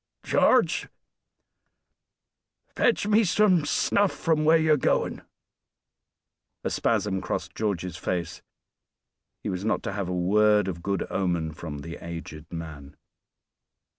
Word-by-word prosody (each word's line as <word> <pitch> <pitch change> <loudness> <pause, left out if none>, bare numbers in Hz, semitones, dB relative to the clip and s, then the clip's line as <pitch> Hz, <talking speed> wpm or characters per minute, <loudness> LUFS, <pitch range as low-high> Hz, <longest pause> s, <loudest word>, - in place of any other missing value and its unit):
"George, - - +3 1.9
fetch 235 -4 +2
me 215 +2 +4
some 185 -4 +3
snuff 200 +6 +2
from 160 -2 0
where 160 +2 +6
you're 155 -1 +4
going." 140 - 0 1.4
A - - -2
spasm 95 -2 0
crossed - - -4
George's 90 -5 -2
face; 90 -1 -3 1.0
he - - -2
was 90 +1 -3
not 110 - 0
to - - -3
have 100 -3 -3
a - - -2
word 105 +3 +3
of 85 -3 -4
good 100 +2 -1
omen 85 -4 -1
from 75 -2 -7
the 85 +3 -8
aged 85 -3 -8
man. 80 -4 -8
95 Hz, 120 wpm, -26 LUFS, -, 1.9 s, where